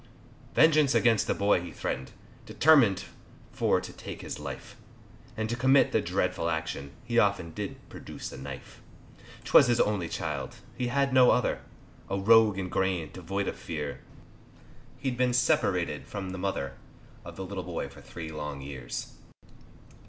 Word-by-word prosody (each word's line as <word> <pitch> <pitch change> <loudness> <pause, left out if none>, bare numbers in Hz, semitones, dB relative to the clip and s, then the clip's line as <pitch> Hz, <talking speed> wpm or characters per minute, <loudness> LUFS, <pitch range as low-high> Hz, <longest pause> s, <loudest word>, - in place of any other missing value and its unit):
Vengeance 155 -3 +5
against 115 -3 +3
the - - +1
boy 100 -3 +3
he 90 - -7
threaten'd 65 - -4 0.4
Determin'd 135 -11 +5 0.5
for - - +2
to - - -8
take - - -8
his - - -6
life, 70 -3 -7 0.6
And 110 0 -1
to 120 - -2
commit 130 +3 +4
the 110 - +2
dreadful 90 -2 -1
action, 80 -4 -3
He 120 0 +2
often 100 -6 +1
did 105 +1 -4
produce - - -8
a - - -9
knife; 65 -1 -9 0.6
'Twas 140 - +6
his 120 -1 +2
only 100 -6 +1
child, - - -4 0.2
he 125 - -2
had 135 +1 +1
no 130 -1 +7
other, 125 - +2 0.5
A 100 - -1
rogue 110 0 +5
in 95 -1 -2
grain, 90 -4 -1
devoid 95 +2 -3
of - - -3
fear, 75 -3 -5 1.0
He'd 130 -3 -3
been 125 -1 +2
separated 95 - +1
from 95 -3 -5
the 95 - -6
mother 70 -8 -3 0.5
Of - - -9
the 95 - -5
little 95 -1 -5
boy 90 -2 -4
for - - -14
three 80 -2 -8
long 75 -2 -5
years. 65 -4 -6
95 Hz, 160 wpm, -28 LUFS, 80-120 Hz, 1.0 s, no